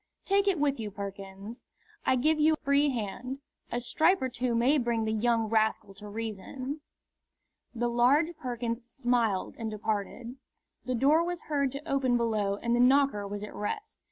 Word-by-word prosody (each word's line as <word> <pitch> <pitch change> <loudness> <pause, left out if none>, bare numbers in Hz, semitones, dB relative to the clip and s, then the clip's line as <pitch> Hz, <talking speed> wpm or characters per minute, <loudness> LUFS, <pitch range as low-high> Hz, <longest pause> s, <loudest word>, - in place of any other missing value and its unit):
"Take 400 +1 +2
it 390 -3 +3
with 280 -3 +1
you, 215 -2 -3
Perkins. 200 +2 -8 0.4
I - - +5
give 310 +5 +2
you 310 +1 +5
a - - -1
free 285 +1 +3
hand. 250 +2 -4 0.3
A 240 - 0
stripe 320 +9 +3
or 260 - -1
two 245 -1 -1
may 260 +6 +4
bring 235 -2 0
the 220 - 0
young 225 +1 +2
rascal 220 -2 +1
to 205 +2 -11
reason." 225 +7 -5 0.9
The 240 +1 0
large 270 +8 +3
Perkins 240 -3 -4
smiled 240 -6 0
and 225 -1 -3
departed. 220 +3 -3 0.5
The 255 - -1
door 290 +7 +4
was 350 0 -3
heard 280 -3 0
to 290 +3 -7
open 265 -4 +2
below 215 -4 0
and 235 +3 0
the - - +1
knocker 255 -5 +4
was 205 +1 -5
at 210 - -7
rest. 420 - -5
240 Hz, 175 wpm, -29 LUFS, 220-280 Hz, 0.9 s, I